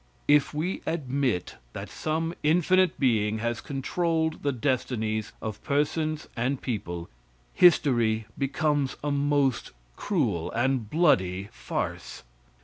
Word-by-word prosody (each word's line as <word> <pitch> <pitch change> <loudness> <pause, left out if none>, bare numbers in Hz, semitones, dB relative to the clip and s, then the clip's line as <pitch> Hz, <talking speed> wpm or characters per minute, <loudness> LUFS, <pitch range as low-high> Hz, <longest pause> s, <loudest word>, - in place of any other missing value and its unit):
If 145 -1 +4
we 160 +5 -2
admit 135 - -1 0.2
that - - -6
some 160 +2 -2
infinite 180 +4 +3
being 110 -5 +2
has 120 0 -2
controlled 160 +3 -1
the 145 - +1
destinies 115 -4 -1
of 110 -1 -5
persons 155 +2 0
and 125 +3 -1
people, 85 -8 -4 0.5
history 120 -10 +4
becomes 140 0 0
a 145 - 0
most 140 -3 +1 0.3
cruel 85 -1 -1
and 120 -2 0
bloody 95 - +2
farce. - - -5
135 Hz, 110 wpm, -27 LUFS, 110-155 Hz, 0.5 s, If